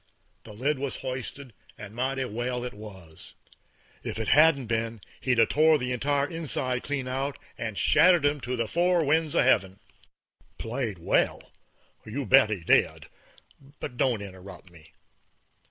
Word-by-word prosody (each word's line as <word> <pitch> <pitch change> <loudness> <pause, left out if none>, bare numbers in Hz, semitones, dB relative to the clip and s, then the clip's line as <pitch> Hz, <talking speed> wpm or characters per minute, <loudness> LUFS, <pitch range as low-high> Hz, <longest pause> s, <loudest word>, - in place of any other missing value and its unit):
The 110 - -10
lid 135 +6 -1
was 140 -1 -2
hoisted, 130 0 -5 0.2
and 105 0 -10
mighty 130 +2 -2
well 120 +2 -3
it 125 - -5
was. 95 -7 -11 0.7
If - - -5
it 110 -1 -2
hadn't 150 -2 +5
been, 115 0 -2 0.2
he'd 125 -2 0
'a' 115 - +6
tore 155 +5 +4
the 125 -2 -3
entire 140 +3 0
inside 135 -6 -2
clean 140 -3 -3
out 135 +2 -3 0.2
and 110 -3 -5
shattered 175 -4 +4
'em 145 0 +1
to 125 +1 -3
the 115 -2 -2
four 175 +5 +2
winds 155 +1 +1
of - - +4
heaven. 100 -6 +2 0.8
Played 115 -4 -4
well? 85 - 0 0.5
You 130 +6 -5
bet 130 -1 +6
he 100 -6 -4
did; - - +2 0.7
but 125 - -6
don't 120 -6 +1
interrupt 95 -1 -12
me. 85 -2 -18
125 Hz, 155 wpm, -27 LUFS, 110-140 Hz, 0.8 s, a